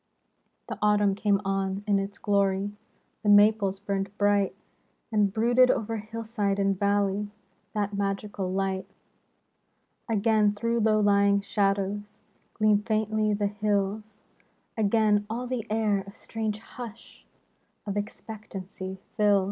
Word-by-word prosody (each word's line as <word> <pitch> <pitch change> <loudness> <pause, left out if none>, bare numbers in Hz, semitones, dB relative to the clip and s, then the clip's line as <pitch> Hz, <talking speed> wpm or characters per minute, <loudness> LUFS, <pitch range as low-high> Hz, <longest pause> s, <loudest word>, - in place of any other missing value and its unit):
The - - -6
Autumn 210 -1 +3
came 200 0 +1
on 195 0 -1
in 205 -2 +2
its 195 +1 -5
glory. 200 0 +1 0.5
The 210 - 0
maples 205 -1 +5
burned 195 -1 -2
bright; 205 -1 +2 0.6
And 210 -2 +2
brooded 240 +4 +4
o'er 225 -1 0
hillside 215 -2 -2
and 195 -1 +1
valley 200 0 +1 0.5
The 205 -1 +1
magical 200 -1 -2
light. 190 0 -2 1.2
Again 215 -1 +3
through 230 +3 0
low 215 -1 +3
lying 200 -1 +4
shadows 200 0 -1 0.4
Gleam 210 -1 +3
faintly 215 0 0
the 205 0 -1
hills, 205 0 -1 0.6
Again 210 -1 +2
all 240 +3 -3
the 250 -3 -3
air 215 -2 +1
a - - -8
strange 220 0 -4
hush 230 0 -11 0.6
Of 200 -1 -3
expectancy 205 -2 -6 0.2
fills. 205 -1 +4
205 Hz, 120 wpm, -27 LUFS, 200-215 Hz, 1.2 s, maples